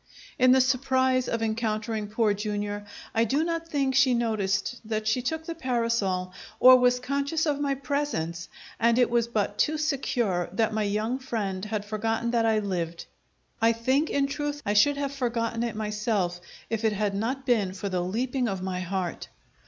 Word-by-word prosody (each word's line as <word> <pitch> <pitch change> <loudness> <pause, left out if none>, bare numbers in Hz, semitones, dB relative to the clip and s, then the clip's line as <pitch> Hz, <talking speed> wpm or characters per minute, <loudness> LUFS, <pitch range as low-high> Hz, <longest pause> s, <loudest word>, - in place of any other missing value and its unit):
In 255 0 +6
the 260 0 +6
surprise 260 0 +2
of 230 -1 -1
encountering 220 -1 -2
Poor 215 0 +1
Jr. 205 0 -3 0.4
I 225 - +3
do 275 +7 +1
not 330 0 -2
think 275 -4 0
she 260 -1 +4
noticed 215 -1 -1
that 215 -1 -3
she 220 +4 +2
took 320 +6 -3
the 335 - -4
parasol 230 - -1 0.3
or 255 0 +9
was 250 0 +3
conscious 280 +5 -1
of 290 -2 0
my 280 -1 0
presence, 265 - -3 0.3
and 235 +1 +3
it 245 -2 +3
was 235 -1 +2
but 210 -2 -2
too 310 +1 +2
secure 245 - 0
that 220 +2 +1
my 215 - 0
young 215 +5 -1
friend 210 -7 -3
had 210 -1 -3
forgotten 225 +2 -1
that 230 -1 +2
I 220 -1 +3
lived. 175 -5 -3 0.6
I 230 +1 +5
think, 260 +7 +1
in 280 -1 +1
truth, 290 +1 -3
I 205 - +1
should 280 +8 +4
have 280 -1 -2
forgotten 230 -3 -1
it 235 -2 -2
myself, 210 -4 -1 0.3
if 225 -1 -3
it 220 -1 +2
had 205 0 -1
not 250 +7 -2
been 220 -7 +2
for 195 +1 -5
the 185 -2 -1
leaping 245 +7 -1
of 190 -3 -3
my 185 -1 -2
heart. 185 -1 -3
230 Hz, 185 wpm, -27 LUFS, 205-260 Hz, 0.6 s, or